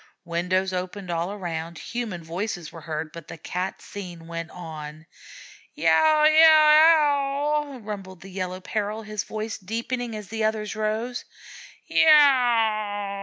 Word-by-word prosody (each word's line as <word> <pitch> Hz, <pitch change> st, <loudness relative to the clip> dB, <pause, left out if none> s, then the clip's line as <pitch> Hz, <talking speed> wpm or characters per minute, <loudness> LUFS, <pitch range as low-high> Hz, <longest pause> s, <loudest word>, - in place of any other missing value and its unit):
Windows 180 Hz, +2 st, -1 dB
opened 185 Hz, 0 st, -4 dB
all 170 Hz, +2 st, -2 dB
around, 170 Hz, -4 st, -5 dB
human 225 Hz, -7 st, -5 dB
voices 175 Hz, 0 st, -5 dB
were 165 Hz, -, -11 dB
heard, 155 Hz, 0 st, -5 dB
but 170 Hz, -2 st, -10 dB
the -, -, -9 dB
Cat 180 Hz, +4 st, -5 dB
scene 175 Hz, -5 st, -9 dB
went 165 Hz, 0 st, -6 dB
on. 155 Hz, -2 st, -9 dB, 0.7 s
"Yow 235 Hz, -, +4 dB
yow 310 Hz, +1 st, +7 dB, 0.8 s
ow!" -, -, -10 dB
rumbled 195 Hz, -4 st, -7 dB
the 195 Hz, -, -11 dB
Yellow 185 Hz, 0 st, -4 dB
Peril, 215 Hz, +2 st, -3 dB
his 210 Hz, -1 st, -4 dB
voice 220 Hz, +1 st, -5 dB
deepening 230 Hz, +3 st, -4 dB
as 210 Hz, -2 st, -8 dB
the 225 Hz, 0 st, -3 dB
other's 215 Hz, -1 st, -1 dB
rose. 220 Hz, +3 st, -2 dB, 0.6 s
"Yow!" 225 Hz, -9 st, +3 dB
200 Hz, 130 wpm, -24 LUFS, 170-225 Hz, 0.8 s, yow